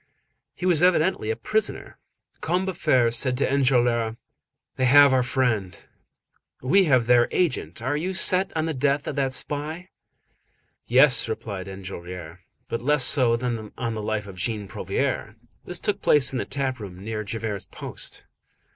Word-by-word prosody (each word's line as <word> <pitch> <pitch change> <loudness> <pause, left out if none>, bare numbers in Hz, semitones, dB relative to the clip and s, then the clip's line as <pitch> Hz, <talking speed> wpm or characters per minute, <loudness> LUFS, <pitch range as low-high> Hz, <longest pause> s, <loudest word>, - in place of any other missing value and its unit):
He 180 - -5
was 175 -4 +3
evidently 180 - +2
a 110 - 0
prisoner. 215 - -3 0.4
Combeferre 175 -9 +1
said 125 +1 0
to 140 - +1
Enjolras:— 120 -4 +1 0.6
"They 130 - 0
have 140 +1 +7
our 130 - +3
friend; 115 -7 -1 0.8
we 185 +10 +3
have 130 -6 +3
their 120 0 +4
agent. 160 -8 -1
Are 130 +4 -1
you 180 +5 -3
set 190 0 +3
on 160 - 0
the 160 - -2
death 140 +1 0
of - - -4
that 135 -1 0
spy?" 155 +6 -2 1.0
"Yes," 130 -1 +5
replied 105 -4 -5
Enjolras; 90 -3 -8 0.3
"but 115 - -4
less 145 +1 +2
so 120 -3 +4
than 115 -3 -4
on 115 -2 -3
the 110 - -4
life 105 0 -2
of 95 -2 -11
Jean 105 +2 -2
Prouvaire." - - -3 0.3
This - - -3
took - - -2
place 145 -3 +4
in 130 - -3
the - - -3
tap 130 -2 -3
room 95 -3 -9
near 110 0 -4
Javert's 105 -1 -4
post. - - -7
125 Hz, 155 wpm, -24 LUFS, 110-145 Hz, 1.0 s, have